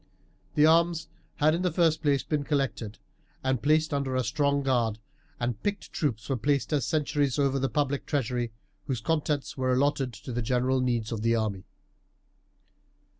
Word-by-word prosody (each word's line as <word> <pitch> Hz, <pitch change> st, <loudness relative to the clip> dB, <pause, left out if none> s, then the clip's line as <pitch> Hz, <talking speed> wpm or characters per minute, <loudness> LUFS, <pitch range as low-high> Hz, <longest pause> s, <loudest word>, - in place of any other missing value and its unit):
The 150 Hz, -, +6 dB
arms 165 Hz, 0 st, +3 dB, 0.3 s
had 155 Hz, +1 st, +3 dB
in 170 Hz, -, 0 dB
the 180 Hz, -1 st, +1 dB
first 160 Hz, -1 st, +2 dB
place 140 Hz, -4 st, +2 dB
been 150 Hz, -2 st, -1 dB
collected 135 Hz, -7 st, -2 dB, 0.5 s
and 130 Hz, -2 st, 0 dB
placed 155 Hz, +1 st, +2 dB
under 140 Hz, -2 st, -1 dB
a 130 Hz, -, +1 dB
strong 140 Hz, +5 st, +1 dB
guard, 120 Hz, -5 st, +1 dB, 0.4 s
and 120 Hz, -3 st, -2 dB
picked 205 Hz, -1 st, -3 dB
troops 120 Hz, -8 st, -2 dB
were 135 Hz, -, 0 dB
placed 140 Hz, +6 st, 0 dB
as 140 Hz, -5 st, +1 dB
sentries 145 Hz, -4 st, 0 dB
over 140 Hz, -1 st, +2 dB
the 135 Hz, 0 st, 0 dB
public 140 Hz, +2 st, -1 dB
treasury, 125 Hz, -4 st, -1 dB, 0.4 s
whose 130 Hz, -5 st, -1 dB
contents 150 Hz, +3 st, -1 dB
were 130 Hz, -1 st, +1 dB
allotted 135 Hz, 0 st, +1 dB
to 110 Hz, +4 st, -8 dB
the 120 Hz, +1 st, -1 dB
general 125 Hz, +2 st, +1 dB
needs 120 Hz, -3 st, 0 dB
of 110 Hz, -2 st, -3 dB
the 115 Hz, +1 st, +2 dB
army. 105 Hz, -4 st, -2 dB
135 Hz, 170 wpm, -28 LUFS, 120-150 Hz, 0.5 s, The